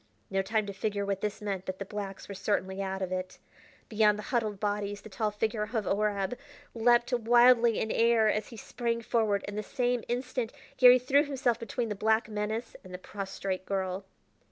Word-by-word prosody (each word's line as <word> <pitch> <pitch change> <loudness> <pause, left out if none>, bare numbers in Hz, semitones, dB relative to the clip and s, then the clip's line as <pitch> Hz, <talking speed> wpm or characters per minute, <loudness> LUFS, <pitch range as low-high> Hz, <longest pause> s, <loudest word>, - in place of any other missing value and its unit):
No 195 0 +2
time 215 +2 0
to 200 - -6
figure 200 0 -2
what 200 -1 -2
this 210 0 -3
meant, 195 -3 -2
but 185 0 -3
the 195 - -5
blacks 195 -1 -6
were 200 - -6
certainly 190 -1 -1
out 190 0 -3
of 185 - -4
it. 185 0 -4 0.5
Beyond 210 -1 +3
the 210 - -6
huddled 215 -5 -1
bodies 205 -1 -2
the 220 - -11
tall 215 +2 -1
figure 210 +1 -2
of 215 0 -2
Horab 205 +2 0 0.3
leaped 240 +2 +3
wildly 240 -1 +5
in 220 - -1
air 230 -1 +4
as 215 0 0
he 230 - -11
sprang 235 +1 -3
forward, 215 -4 +1
and 205 - -5
in - - -6
the - - 0
same 245 -2 0
instant 250 -1 -2 0.2
Garry 250 -1 +9
threw 270 +3 +3
himself 265 -5 0
between 230 +1 -3
the - - -1
black 220 +2 +2
menace 215 +2 -3
and 185 - -12
the - - -5
prostrate 190 -1 -5
girl. 190 -1 -2
215 Hz, 200 wpm, -29 LUFS, 200-235 Hz, 0.5 s, Garry